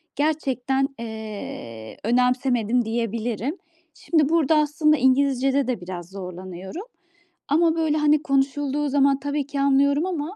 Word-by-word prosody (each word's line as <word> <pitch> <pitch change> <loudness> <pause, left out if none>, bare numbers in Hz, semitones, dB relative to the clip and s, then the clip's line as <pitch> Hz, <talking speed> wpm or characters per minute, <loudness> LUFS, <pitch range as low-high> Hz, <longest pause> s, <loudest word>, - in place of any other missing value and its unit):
gerçekten, 270 -3 0
eee, 210 - -7
önemsemedim 245 -1 +1
diyebilirim. 230 - -2 0.4
Şimdi 310 -3 +1
burada 320 -2 +3
aslında 305 0 +2
İngilizce'de 270 +1 +2
de 235 -8 -2
biraz 175 -1 -7
zorlanıyorum 190 - -8 0.6
ama 325 +2 +3
böyle, 315 -2 +1
hani, 300 0 +3
konuşulduğu 280 +1 0
zaman, 275 0 +3
tabii 285 0 -2
ki, 285 -1 -4
anlıyorum 280 +3 +3
ama, 350 +1 -4
270 Hz, 115 wpm, -23 LUFS, 230-295 Hz, 0.6 s, burada